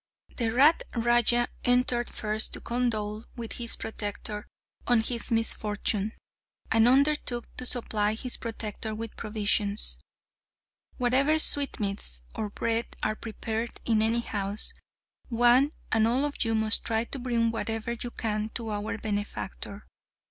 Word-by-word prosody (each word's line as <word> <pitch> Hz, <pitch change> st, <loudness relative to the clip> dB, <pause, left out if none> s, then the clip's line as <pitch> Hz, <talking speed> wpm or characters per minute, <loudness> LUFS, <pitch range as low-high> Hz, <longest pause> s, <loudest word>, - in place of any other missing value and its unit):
The 230 Hz, -3 st, 0 dB
rat 285 Hz, +8 st, +5 dB
raja 240 Hz, 0 st, +4 dB, 0.2 s
entered 245 Hz, -1 st, +3 dB
first 215 Hz, 0 st, 0 dB
to -, -, +1 dB
condole 220 Hz, -3 st, -2 dB
with 235 Hz, -3 st, -6 dB
his 235 Hz, -, -1 dB
protector 210 Hz, -1 st, -5 dB, 0.4 s
on 240 Hz, -2 st, +4 dB
his 235 Hz, +1 st, +1 dB
misfortune, 215 Hz, -2 st, 0 dB, 0.6 s
and 225 Hz, +1 st, +5 dB
undertook 265 Hz, -2 st, +2 dB
to 255 Hz, -, -2 dB
supply 215 Hz, -4 st, +1 dB
his 250 Hz, +2 st, -2 dB
protector 220 Hz, -1 st, -5 dB
with 225 Hz, 0 st, -6 dB
provisions. 210 Hz, -1 st, 0 dB, 1.0 s
"Whatever 270 Hz, +5 st, +3 dB
sweetmeats 205 Hz, -, +2 dB
or 215 Hz, -, -3 dB
bread 230 Hz, +2 st, -1 dB, 0.2 s
are 215 Hz, -, +1 dB
prepared 225 Hz, +1 st, -5 dB
in 220 Hz, -2 st, +3 dB
any 225 Hz, +2 st, +3 dB
house, 205 Hz, -2 st, +1 dB, 0.6 s
one 245 Hz, +4 st, +4 dB, 0.2 s
and 225 Hz, 0 st, +3 dB
all 255 Hz, +5 st, +2 dB
of 290 Hz, -, -2 dB
you 225 Hz, -1 st, 0 dB
must 220 Hz, 0 st, +4 dB
try 225 Hz, -1 st, 0 dB
to 265 Hz, +3 st, -5 dB
bring 235 Hz, -2 st, +1 dB
whatever 225 Hz, 0 st, -3 dB
you 235 Hz, +1 st, -4 dB
can 215 Hz, -2 st, -2 dB
to 230 Hz, -2 st, -3 dB
our 210 Hz, +2 st, -3 dB
benefactor. 205 Hz, -1 st, -5 dB
225 Hz, 135 wpm, -28 LUFS, 215-240 Hz, 1.0 s, rat